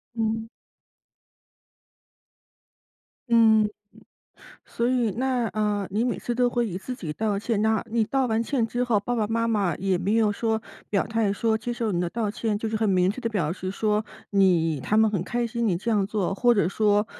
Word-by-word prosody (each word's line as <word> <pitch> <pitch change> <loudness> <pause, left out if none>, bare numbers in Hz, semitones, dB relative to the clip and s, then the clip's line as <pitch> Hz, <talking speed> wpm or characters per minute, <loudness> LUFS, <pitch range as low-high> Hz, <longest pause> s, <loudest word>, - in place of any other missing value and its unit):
嗯。 225 0 -1 2.8
嗯， 220 -2 +5 1.0
所 235 +1 -1
以 245 -4 +1
那， 250 -1 0
呃， 210 -2 -1
你 215 +4 0
每 245 - -1
次 240 - -3
都 245 0 +2
会 240 -1 0
以 180 - -5
自 250 +6 -5
己 160 -11 -6
道 210 0 -1
歉 210 0 -1
那 220 -1 +2
你 230 -1 +2
道 265 +3 0
完 225 0 +1
歉 240 -2 0
之 245 +2 -1
后， 225 -4 +2
爸 245 +4 -2
爸 220 -3 0
妈 230 +1 0
妈 200 -6 +1
也 190 0 0
没 195 +5 0
有 220 -2 +3
说 220 +1 -1 0.3
表 200 -2 +1
态 220 -2 0
说 220 +2 +1
接 240 +2 -4
受 230 -2 -2
你 175 - -1
的 175 -1 -1
道 220 -1 -2
歉， 215 -1 -2
就 220 - -3
是 220 - -2
很 220 - +1
明 185 0 +3
确 250 +5 -6
地 230 - 0
表 180 -9 -1
示 185 +2 -4
说 210 +1 0 0.3
你 175 -7 +3
他 215 +10 +1
们 220 -1 +4
很 190 -4 -2
开 240 +3 -1
心 235 0 -2
你 180 -5 +1
这 230 +6 -3
样 200 -3 +2
做。 205 -3 -1
或 240 +3 +3
者 200 -6 +2
说 210 +1 +2
220 Hz, 215 characters per minute, -25 LUFS, 200-230 Hz, 2.8 s, 嗯